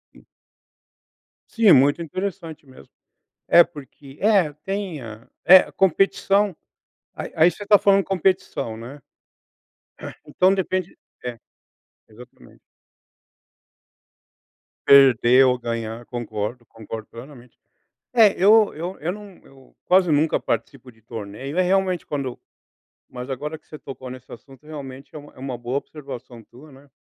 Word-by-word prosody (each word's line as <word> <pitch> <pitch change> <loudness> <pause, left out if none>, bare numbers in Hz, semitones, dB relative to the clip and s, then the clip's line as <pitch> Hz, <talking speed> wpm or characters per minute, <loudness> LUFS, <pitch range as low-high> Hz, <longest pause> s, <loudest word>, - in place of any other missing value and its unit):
Hum. - - -19 1.3
Sim, 225 -4 +4
muito 140 +5 +4
interessante 170 -2 -6
mesmo. 130 - -17 0.6
É 170 - +7
porque 145 -3 -14
é, 200 -7 +3
tem 195 -6 -4
a 110 -1 -11 0.2
é 185 +2 +7
competição, 195 +1 +1 0.6
Aí - - -7
aí 165 +2 +5
você 205 - -10
tá 205 0 +6
falando 195 -1 +3
competição, 185 -10 -1
né. 120 +6 -10 1.3
Então 185 +6 +2
depende 185 -1 -3 0.3
é, 120 -1 -5 0.7
exatamente. 110 - -17 2.3
Perder 130 -2 +6
ou 125 -1 +1
ganhar 115 0 -5
concordo 120 0 -5
concordo 110 0 -9
plenamente. 125 0 -13 0.6
É, 220 -4 +6
eu 215 +2 +5
eu 175 +5 -6
eu 165 +4 -2
não 205 -1 -11
eu 135 -1 -21
quase 180 -1 +3
nunca 150 +2 +1
participo 120 +3 -4
de 110 - -27
torneio, 115 - -8
é - - +4
realmente 185 -1 0
quando 140 -4 -5 0.7
mas 125 +1 -8
agora 150 +4 -5
que - - -24
você 155 - -11
tocou 130 -2 -9
nesse 130 0 -11
assunto, 135 +4 -15
realmente 140 -3 -10
é - - -6
uma 145 0 -14
é - - -19
uma 130 -1 -5
boa 120 +2 -4
observação 130 -5 -10
tua, 135 +7 -17
né 135 +1 -19
145 Hz, 130 wpm, -22 LUFS, 125-185 Hz, 2.3 s, É